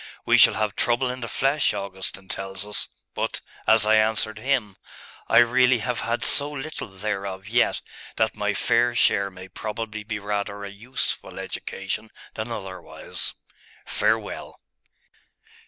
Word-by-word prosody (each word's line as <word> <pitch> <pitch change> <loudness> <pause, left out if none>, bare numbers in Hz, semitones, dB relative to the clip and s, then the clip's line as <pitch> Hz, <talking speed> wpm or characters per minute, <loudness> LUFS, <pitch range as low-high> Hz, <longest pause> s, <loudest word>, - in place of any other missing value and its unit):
We - - +5
shall - - +8
have 105 -2 0
trouble 120 +2 +1
in 125 - -6
the 115 - -4
flesh, 135 +3 +2
Augustine 95 -1 -5
tells 95 +1 -4
us.... 105 0 -2 0.2
But, - - -2 0.3
as 110 -1 +6
I 110 0 +5
answered 110 0 +1
him, 120 -5 0 0.5
I - - +4
really 125 +1 +6
have 120 +2 -2
had 120 +1 -1
so 145 0 +5
little 150 0 -5
thereof 95 -1 -4
yet, 120 +2 +2 0.3
that 110 0 +2
my 105 -1 -1
fair 120 +3 +2
share 100 -3 +3
may 95 0 -11
probably 110 +2 -5
be 105 0 -3
rather 100 0 -3
a 100 - -6
useful 115 +6 -4
education 95 +3 -4 0.2
than 110 +2 -4
otherwise. 95 -5 -4 0.5
Farewell! - - -1
110 Hz, 140 wpm, -25 LUFS, 100-120 Hz, 0.5 s, shall